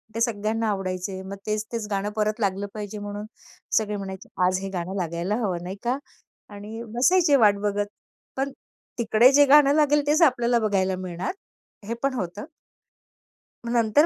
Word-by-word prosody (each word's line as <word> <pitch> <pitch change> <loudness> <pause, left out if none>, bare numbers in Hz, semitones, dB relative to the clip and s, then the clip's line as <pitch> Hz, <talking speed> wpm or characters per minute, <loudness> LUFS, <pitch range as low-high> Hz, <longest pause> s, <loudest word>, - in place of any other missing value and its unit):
ते 230 - -2
सगळ्यांना 225 -1 0
आवडायचे. 190 -1 -3
मग 195 +1 -6
तेच-तेच 215 +1 -2
गाणं 200 +1 -1
परत 215 +1 0
लागलं 200 -1 -1
पाहिजे, 210 0 -6
म्हणून 205 0 -6 0.5
सगळे 210 -1 0
म्हणायचे, 190 -1 -7 0.2
"आज 185 +1 +2
हे 195 - -4
गाणं 185 0 -4
लागायला 175 +3 -2
हवं 180 -4 -2
नाही 185 +2 -5
का" 245 +2 0 0.6
आणि 210 +3 -8
बसायचे 295 +4 +4
वाट 210 -5 +5
बघत. 205 0 0 0.5
पण 275 +1 -1 0.5
तिकडे 235 +2 +5
जे 290 +1 +7
गाणं 285 0 +6
लागेल, 295 -1 +3
तेच 305 +3 +3
आपल्याला 245 -5 +4
बघायला 190 -2 +1
मिळणार, 180 - -4 0.5
हे 230 - -2
पण 275 -1 +1
होतं. 205 -2 -4 1.2
मग 235 - -3
नंतर 235 +5 +4
210 Hz, 160 wpm, -25 LUFS, 195-240 Hz, 1.2 s, जे